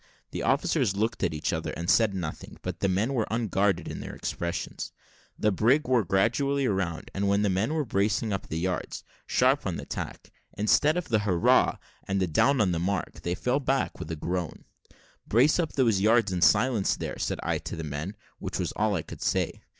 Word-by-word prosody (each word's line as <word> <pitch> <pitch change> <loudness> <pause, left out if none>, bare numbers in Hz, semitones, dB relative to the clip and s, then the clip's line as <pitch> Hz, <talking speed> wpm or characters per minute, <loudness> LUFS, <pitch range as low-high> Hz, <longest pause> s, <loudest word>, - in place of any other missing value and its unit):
The - - -4
officers 100 - +1
looked 110 +3 -1
at 90 - +2
each 80 +1 -2
other, 80 0 -2
and 85 - -4
said 110 0 +4
nothing; 80 -5 -6
but 90 -2 -4
the 100 - +1
men 105 +8 +1
were 115 -5 0
unguarded 100 -5 +1
in - - -5
their - - -7
expressions. 85 0 -4 0.5
The 105 - +2
brig 120 - +3
wore 125 -3 +3
gradually 130 +9 +1
round; 90 -6 -2
and 100 +1 -1
when 100 +1 +2
the 100 - +2
men 110 +11 0
were 155 -2 0
bracing 105 0 0
up 95 - -4
the 80 - -3
yards, 90 +2 -3 0.2
sharp - - +2
on - - -2
the - - -5
other - - -15
tack, - - -6 0.3
instead 145 - +3
of 180 - -3
the 110 -2 +3
"Hurrah!" 95 -5 +3 0.3
and 95 -4 0
"Down 140 - +4
with 105 -6 +3
the 85 - 0
mark," 90 +1 -2
they 85 +1 -2
fell 125 +7 0
back 135 0 -1
with 75 - -6
a 80 - -2
groan. 85 +2 -4 0.6
"Brace 130 - +4
up 165 -3 -1
those 115 -8 +2
yards 110 -1 +4
in 90 -1 -2
silence 105 +2 +3
there," - - -5
said - - -2
I - - 0
to - - -6
the 80 - -5
men, 75 +7 -4 0.2
which - - -4
was - - -2
all 105 -1 0
I 80 - -2
could - - -10
say. - - 0
100 Hz, 210 wpm, -27 LUFS, 90-115 Hz, 0.6 s, said